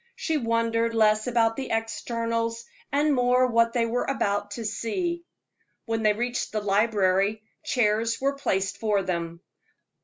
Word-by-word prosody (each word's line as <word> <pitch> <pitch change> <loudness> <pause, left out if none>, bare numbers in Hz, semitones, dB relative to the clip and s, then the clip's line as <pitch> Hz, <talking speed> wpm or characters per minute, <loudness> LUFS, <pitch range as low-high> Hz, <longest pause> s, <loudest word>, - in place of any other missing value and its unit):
She 320 - -2
wondered 230 -2 0
less 215 0 +3
about 230 -2 +2
the 270 - -4
externals, 230 +1 -2 0.3
and 290 +2 +2
more 250 0 +3
what 230 -1 +2
they 235 -2 +2
were 235 +2 -1
about 205 -6 -1
to 225 +2 -6
see. 340 - -2 0.6
When 225 -1 -1
they 215 -1 +4
reached 240 +3 -2
the 215 - -1
library, 205 0 +1 0.2
chairs 225 -1 +1
were 275 +1 +1
placed 195 -9 -1
for 210 -3 +1
them. 170 -2 -4
230 Hz, 145 wpm, -26 LUFS, 210-245 Hz, 0.6 s, they